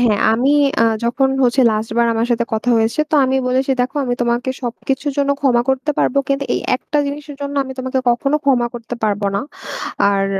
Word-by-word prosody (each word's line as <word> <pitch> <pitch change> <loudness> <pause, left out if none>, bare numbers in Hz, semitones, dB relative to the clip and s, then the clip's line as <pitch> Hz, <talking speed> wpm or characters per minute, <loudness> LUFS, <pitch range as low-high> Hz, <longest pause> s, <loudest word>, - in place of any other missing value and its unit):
হ্যাঁ। 220 -4 +3
আমি 250 +5 +2 0.3
আ - - +5 0.2
যখন 265 +3 +1 0.2
হচ্ছে 245 +2 +2
লাস্টবার 220 +2 0
আমার 225 +1 0
সাথে 235 0 +1
কথা 220 +3 0
হয়েছে 225 +6 +1
তো - - +1
আমি 260 +1 +1
বলেছি 260 +2 0
দেখো 255 +4 -2
আমি 245 -1 -1
তোমাকে 240 +2 0
সবকিছুর 265 +4 -3
জন্য 280 0 +2
ক্ষমা 245 -4 +3
করতে 265 +3 0
পারবো 280 - +2
কিন্তু 275 0 0
এই - - -1 0.2
একটা 295 +3 -3
জিনিসের 290 0 -6
জন্য 285 0 -4
আমি 265 - -7
তোমাকে 260 0 -2
কখনো 275 +5 +1
ক্ষমা 255 -4 +3
করতে 235 +1 -6
পারবোনা। 200 -2 0 0.7
আর 195 0 +1
245 Hz, 190 wpm, -18 LUFS, 230-275 Hz, 0.7 s, আ